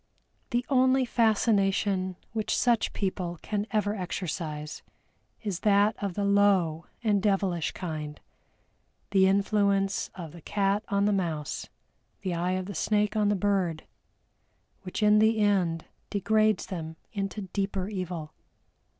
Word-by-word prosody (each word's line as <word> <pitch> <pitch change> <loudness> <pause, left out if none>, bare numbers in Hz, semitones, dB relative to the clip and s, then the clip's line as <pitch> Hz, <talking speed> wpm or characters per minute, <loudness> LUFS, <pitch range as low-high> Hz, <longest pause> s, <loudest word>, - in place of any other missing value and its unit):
The 240 0 0
only 260 -1 +3
fascination 200 -5 +2 0.2
which 220 -2 -1
such 240 -2 +2
people 180 -3 -3
can 210 0 -2
ever 210 -2 0
exercise 165 -5 -4 0.6
is 200 -5 -2
that 205 +1 +3
of 195 -3 -2
the 205 - 0
low 195 -5 +3 0.2
and 205 -3 +2
devilish 195 -5 +1
kind, 155 -4 -5 0.9
the 190 -1 +5
influence 200 0 +2
of 170 -5 -7
the 170 +1 -12
cat 200 +4 0
on 200 0 +1
the 205 - +3
mouse, 165 -6 -2 0.5
the 185 -3 -2
eye 175 +2 0
of 185 0 -2
the 200 - -6
snake 210 +1 +1
on 210 -1 +2
the 205 - +2
bird, 190 -5 0 1.0
which 190 +3 -4
in 210 0 +6
the 220 +1 +4
end 185 -6 +1 0.2
degrades 215 0 +2
them 160 -3 -6 0.2
into 200 0 -3
deeper 195 -2 -1
evil. 180 -6 -5
200 Hz, 135 wpm, -28 LUFS, 180-210 Hz, 1.0 s, in